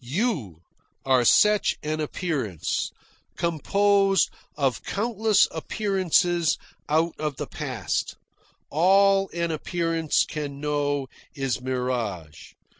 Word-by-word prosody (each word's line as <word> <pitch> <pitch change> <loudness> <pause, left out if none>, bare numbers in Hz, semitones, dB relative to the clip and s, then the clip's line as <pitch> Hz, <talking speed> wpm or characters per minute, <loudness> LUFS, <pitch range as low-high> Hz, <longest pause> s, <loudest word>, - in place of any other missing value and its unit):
You 130 - -2 0.4
are 130 -2 +4
such 210 - +4
an 155 +1 -2
appearance, 145 - -2 0.5
composed 195 +3 +2 0.3
of 135 -4 0
countless 220 -1 +2
appearances 175 -2 +1 0.3
out 160 +2 +2
of 150 -2 -2
the - - -4
past. - - -3 0.6
All 195 +4 +4
an 170 -1 -2
appearance 165 0 0
can 145 -3 -5
know 145 -1 -1 0.3
is 135 -3 -2
mirage. 120 -11 -4
155 Hz, 95 wpm, -25 LUFS, 135-195 Hz, 0.6 s, are